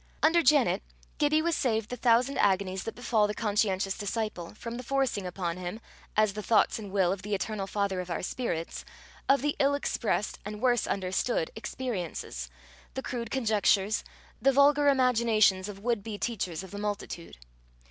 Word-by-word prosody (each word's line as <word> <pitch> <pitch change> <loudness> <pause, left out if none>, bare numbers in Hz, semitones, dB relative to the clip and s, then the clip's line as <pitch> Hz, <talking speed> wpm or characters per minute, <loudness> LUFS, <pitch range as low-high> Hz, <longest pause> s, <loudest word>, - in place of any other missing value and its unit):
Under 335 +2 +5
Janet, 275 - +4 0.4
Gibbie 305 +1 +3
was 335 -1 +1
saved 225 -3 0
the - - -2
thousand 245 +3 +3
agonies 190 -1 +1
that 225 - -5
befall 225 -4 +2
the 210 - -4
conscientious 200 -3 0
disciple, 210 -4 -4
from 230 +2 -6
the - - -5
forcing 255 -7 0
upon 175 -1 -3
him, 180 +4 -5 0.4
as 215 -2 +4
the 210 - -4
thoughts 225 +1 +3
and 205 -3 -8
will 190 -3 +2
of 195 -1 -3
the 205 0 -2
eternal 200 0 -3
Father 200 -2 -1
of 180 0 -5
our 170 - -3
spirits, 175 -6 -3 0.5
of 275 -1 +4
the 295 0 +1
ill 280 0 +3
expressed 230 -6 -1
and 210 +1 -6
worse 240 -2 +2
understood 190 -1 -1
experiences, 185 - -4 0.5
the 265 - -3
crude 235 -2 -4
conjectures, 215 -4 +2 0.4
the 275 - +5
vulgar 285 +2 +5
imaginations 230 -7 +3
of 200 - -7
would 230 +1 -1
be 210 0 -6
teachers 190 -7 -3
of 190 - -11
the 205 - -6
multitude. 205 - -5
215 Hz, 170 wpm, -29 LUFS, 195-250 Hz, 0.5 s, Under